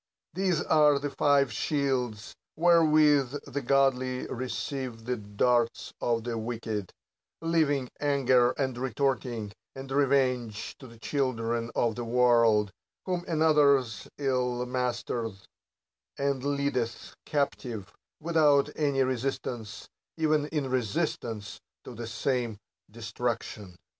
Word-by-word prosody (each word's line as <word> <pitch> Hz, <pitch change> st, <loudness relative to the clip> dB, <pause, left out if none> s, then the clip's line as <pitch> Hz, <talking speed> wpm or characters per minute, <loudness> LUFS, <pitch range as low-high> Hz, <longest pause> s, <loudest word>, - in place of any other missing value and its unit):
These 185 Hz, -3 st, +1 dB
are 150 Hz, -2 st, +4 dB
the 145 Hz, 0 st, -3 dB
five 140 Hz, -4 st, +3 dB
shields, 125 Hz, -6 st, -1 dB, 0.2 s
wherewith 155 Hz, -5 st, +4 dB
the 140 Hz, 0 st, -4 dB
godly 130 Hz, -1 st, +1 dB
receive 130 Hz, -2 st, -4 dB
the 125 Hz, +1 st, -1 dB
darts 115 Hz, +3 st, 0 dB
of 115 Hz, -2 st, 0 dB
the 115 Hz, -1 st, -3 dB
wicked: 110 Hz, -3 st, -4 dB, 0.5 s
leaving 155 Hz, -5 st, +1 dB
anger, 130 Hz, -4 st, +3 dB
and 130 Hz, -3 st, -1 dB
retorting, 125 Hz, -4 st, -1 dB, 0.2 s
and 135 Hz, 0 st, -8 dB
revenge 130 Hz, -5 st, +1 dB
to 130 Hz, -, -11 dB
the 115 Hz, -1 st, -14 dB
children 115 Hz, -3 st, -1 dB
of 115 Hz, -2 st, +2 dB
the 120 Hz, -, -5 dB
world; 115 Hz, -3 st, +3 dB, 0.3 s
whom 180 Hz, -2 st, -1 dB
another's 150 Hz, -, +3 dB
ill 125 Hz, -3 st, 0 dB
mastereth, 120 Hz, -4 st, -3 dB, 0.7 s
and 140 Hz, -2 st, -1 dB
leadeth 140 Hz, -5 st, -2 dB
captive, 125 Hz, -8 st, -2 dB, 0.3 s
without 150 Hz, -3 st, +3 dB
any 140 Hz, -3 st, +2 dB
resist 130 Hz, +1 st, -2 dB
ance, 110 Hz, -4 st, -6 dB, 0.3 s
even 155 Hz, -2 st, +2 dB
in 150 Hz, -3 st, -2 dB
resistance, 120 Hz, -4 st, -2 dB, 0.2 s
to 125 Hz, -, -9 dB
the 115 Hz, 0 st, -6 dB
same 115 Hz, -1 st, -1 dB, 0.3 s
destruction. 115 Hz, -3 st, -4 dB
130 Hz, 110 wpm, -28 LUFS, 115-140 Hz, 0.7 s, are